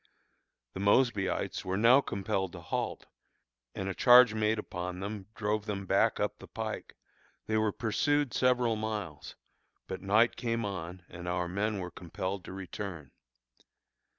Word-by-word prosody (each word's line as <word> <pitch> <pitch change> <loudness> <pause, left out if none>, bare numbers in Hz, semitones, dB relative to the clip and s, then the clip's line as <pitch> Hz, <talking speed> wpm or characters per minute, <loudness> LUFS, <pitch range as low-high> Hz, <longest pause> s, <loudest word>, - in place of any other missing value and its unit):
The - - -6
Mosbyites 100 -1 +2
were 95 +1 -1
now 120 +6 +6
compelled 95 -5 -2
to 90 - -8
halt, 85 - -3 0.7
and 95 - -3
a 95 - -1
charge 125 +1 +7
made 110 0 +1
upon 90 -3 -5
them 100 0 -5
drove 105 0 -1
them 100 -2 -3
back - - +2
up - - -1
the - - -11
pike. - - -5 0.5
They 110 - -1
were 110 -1 +2
pursued 140 +5 +1
several 125 -3 +3
miles, 105 -8 -5 0.5
but 95 -1 -6
night 110 +4 +3
came 115 -2 -1
on 90 -2 -5
and 85 +1 -9
our 90 0 -1
men 100 +4 -1
were 90 -2 -5
compelled 95 +3 -5
to - - -8
return. 90 -5 -6
100 Hz, 150 wpm, -31 LUFS, 90-110 Hz, 0.7 s, charge